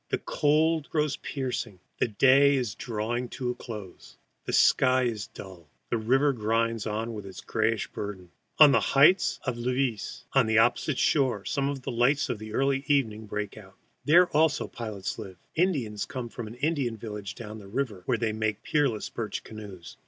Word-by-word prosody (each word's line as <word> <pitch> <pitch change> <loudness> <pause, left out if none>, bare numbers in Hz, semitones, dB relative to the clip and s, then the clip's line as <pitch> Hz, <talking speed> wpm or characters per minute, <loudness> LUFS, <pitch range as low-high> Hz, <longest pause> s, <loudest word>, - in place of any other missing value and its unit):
The - - 0
cold 155 +1 +1
grows 150 -3 0
piercing. 125 -7 -4 0.2
The - - +2
day 135 +6 +5
is 125 -6 -1
drawing 120 +2 -3
to 125 -2 -1
a - - -3
close. 105 -7 -10 0.3
The - - -3
sky 130 -1 +4
is 110 -5 -2
dull. 90 -5 -12 0.2
The 120 - +1
river 135 +6 +3
grinds 115 -1 0
on 110 +2 -3
with 105 -2 -6
its 95 -1 -9
grayish 110 0 0
burden. 95 -4 -7 0.3
On 150 -2 +9
the - - +5
heights 150 +7 +4
of 125 -3 -3
Levis, 125 -1 -2
opposite, 120 +3 +3 0.5
some 140 0 0
lights 125 +5 +1
of 110 - -3
early 135 +5 0
evening 110 -7 +1
break 105 0 -4
out. - - -14 0.3
There 175 +4 +6
also 155 -2 +3
pilots 105 -5 -5
live, 95 -2 -8 0.2
Indians 135 - 0
come 125 -3 -6
from 115 -1 -7
an 110 - -9
Indian 135 -4 -1
village 105 -4 -6
down 110 -1 -8
the 100 - -12
river, 110 -3 -3
where 125 - +2
they 110 -1 -1
make 110 -1 -2
the - - -13
peerless 135 -8 +1
birch 110 -3 -5
canoes. 100 -5 -10
115 Hz, 165 wpm, -27 LUFS, 105-135 Hz, 0.5 s, On